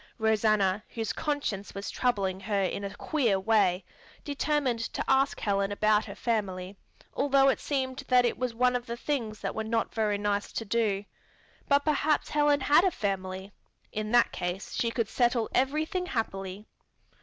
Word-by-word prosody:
Rosanna, 215 -3 +2
whose 225 -2 -2
conscience 285 -12 -3
was 200 0 -4
troubling 195 -7 0
her 195 0 0
in 195 +2 -2
a 200 0 -5
queer 235 -10 +1
way, 190 -3 +2 0.4
determined 285 -4 0
to 230 - -3
ask 270 +1 +2
Helen 200 -1 0
about 215 +1 +2
her - - -8
family, 195 -5 -2 0.4
although 275 -1 +4
it - - +1
seemed 260 -2 -2
that 250 -2 +4
was 250 -2 -3
one 250 +1 +3
of 245 0 -3
the 235 0 -4
things 235 -6 -3
that - - -2
were 220 - -3
not 225 +1 -1
very 210 -2 +1
nice 205 0 -1
to 225 - -3
do. 205 -2 0 0.6
But 285 0 +3
perhaps 305 0 +1
Helen 295 -1 +3
had 295 +5 +5
a 380 - +4
family. 195 - -3 0.4
In 215 0 -3
that 240 0 +4
case 180 +2 -4
she 235 - 0
could 230 -2 -1
settle 240 0 +1
everything 310 +8 0
happily. 195 - -4
225 Hz, 165 wpm, -28 LUFS, 200-265 Hz, 0.6 s, had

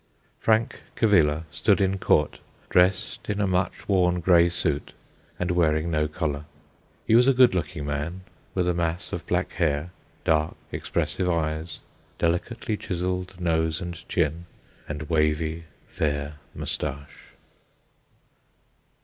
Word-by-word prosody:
Frank 110 +1 +2 0.2
Cavilla 80 -8 +3
stood 105 -2 +2
in 95 0 +1
court, - - +2 0.3
dressed 90 +3 +2
in 105 0 -1
a 105 - +2
much 90 -1 -1
worn 90 -3 +3
grey 85 0 +5
suit, 75 -4 -1 0.4
and 90 0 -1
wearing 80 -1 +2
no 75 -1 +1
collar. 75 -2 -3 0.6
He - - +2
was 120 +3 +6
a 135 - +5
good 125 -4 +6
looking 75 -4 -2
man, 75 +6 -3 0.3
with 90 -2 +1
a 90 - +2
mass 85 0 -2
of - - -5
black - - 0
hair, 75 +1 0 0.3
dark, 80 0 +2 0.2
expressive 90 -1 -1
eyes, 80 -1 -2 0.4
delicately 105 +6 -1
chiselled 90 0 -3
nose 80 -2 +1
and 90 -1 -5 0.2
chin, 85 0 0 0.4
and 75 0 -4
wavy, 80 +1 0 0.2
fair 75 -1 -2 0.2
moustache. 70 +2 -4
85 Hz, 125 wpm, -25 LUFS, 75-90 Hz, 0.6 s, was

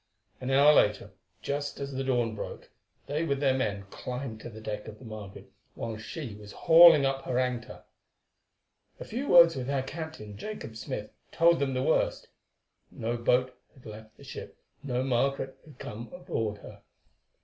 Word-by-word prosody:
An 130 - -4
hour 140 +3 +6
later, 105 -5 +2 0.3
just 145 0 -3
as 140 0 -4
the 135 +1 -2
dawn 120 -4 +1
broke, 110 - -7 0.3
they 150 +3 -1
with 140 -4 0
their 135 -2 +3
men 105 -6 -1
climbed 125 -3 -5
to 120 - -7
the 110 -1 -10
deck 105 -1 -5
of 110 -1 -9
the 125 - -14
Margaret 105 -3 -9 0.2
while 115 -1 -4
she 115 +3 -7
was 105 0 -11
hauling 165 -3 +8
up 135 0 -1
her 125 - -1
anchor. 125 -2 -2 1.2
A - - -7
few 255 +6 -4
words 170 -2 +8
with 130 -2 -4
her 140 -1 0
captain, 155 -9 -7
Jacob 160 - -7
Smith, 105 -1 -5 0.2
told 170 0 +4
them 135 -2 0
the 130 - 0
worst. - - +1 0.6
No 115 +2 -3
boat 125 +2 +2 0.2
had 130 - -19
left 110 0 -11
the - - -15
ship, - - -9 0.2
no 130 -2 -1
Margaret 135 +1 0
had 150 - -15
come 115 +3 -8
aboard 165 - -3
her. - - -12
130 Hz, 170 wpm, -29 LUFS, 110-140 Hz, 1.2 s, hauling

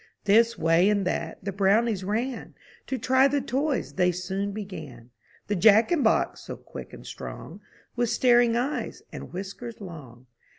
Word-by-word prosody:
This 225 +3 +4
way 165 +4 +3
and 200 -2 +1
that, 180 - -3
the 200 - -1
Brownies 200 +1 +2
ran; 230 +5 -3 0.3
To 265 - -2
try 260 +3 +4
the 285 +1 0
toys 275 +2 -2
they 180 -1 +2
soon 190 +3 -3
began. 160 - -8 0.3
The 205 - -1
Jack 215 - +5
in 340 -4 +2
box, 220 - +1
so - - -8
quick - - -10
and - - -12
strong, - - -9 0.3
With 240 -1 0
staring 240 -1 +4
eyes 265 +5 -3
and - - -8
whiskers 200 +5 -7
long. 140 - -11
210 Hz, 160 wpm, -26 LUFS, 185-240 Hz, 0.3 s, Jack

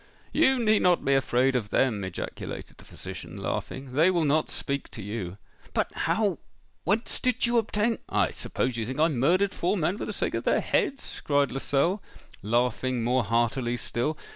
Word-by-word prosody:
"You 265 -4 +4
need 220 -3 +3
not 180 -1 +3
be 140 - +3
afraid 135 0 +2
of 110 -5 -1
them!" 110 -6 +1
ejaculated 95 -1 -6
the - - -14
physician, - - -8
laughing: 130 -1 -4
"they 160 +6 +5
will 175 -4 +2
not 150 +2 +2
speak 140 -1 -2
to 110 - -8
you." 100 -3 -5 0.4
"But - - 0
how—whence 210 +1 -2
did 250 -1 +1
you 235 0 +3
obtain——" 225 +1 0
"I - - +2
suppose 125 -1 -2
you 115 - -1
think 130 +3 -4
I 160 +2 +5
murdered 175 +9 +2
four 185 +4 0
men 180 +5 0
for - - -3
the - - -4
sake - - -2
of - - -2
their - - +3
heads?" 275 0 -1
cried 145 -1 +2
Lascelles, 140 - +1 0.4
laughing 120 +2 0
more 125 +2 +2
heartily 120 +3 +1
still. 120 +7 -2
140 Hz, 175 wpm, -27 LUFS, 120-190 Hz, 0.4 s, they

